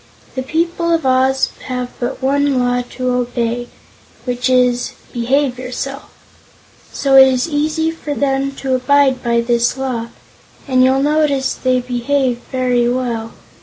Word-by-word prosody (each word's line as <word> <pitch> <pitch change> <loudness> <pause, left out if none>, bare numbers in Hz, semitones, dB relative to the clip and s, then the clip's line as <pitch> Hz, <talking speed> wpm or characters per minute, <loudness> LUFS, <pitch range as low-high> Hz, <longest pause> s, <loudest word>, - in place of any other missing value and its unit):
The 260 - -3
people 335 +5 -1
of 325 - -3
Oz 260 +1 +2 0.2
have 250 -1 -3
but 250 +2 -4
one 280 0 +2
law 245 0 +1 0.2
to 255 -1 0
obey, 240 -1 -1 0.6
which 250 0 -1
is: 250 -1 +2 0.2
'Behave 250 +2 0
Yourself,' 270 +2 -6 0.8
so 275 -1 +1
it 265 0 +9
is 255 +1 +1
easy 310 +1 0
for 300 -3 -5
them 275 -1 0
to 265 -1 -2
abide 265 0 +3
by 235 0 +1
this 235 +1 +1
Law, 250 -4 -3 0.6
and 255 -1 +3
you'll 265 +1 +3
notice 290 -3 +1
they 255 -1 0
behave 250 +1 -1
very 250 -2 +1
well. 235 -3 -2
255 Hz, 140 wpm, -17 LUFS, 245-275 Hz, 0.8 s, it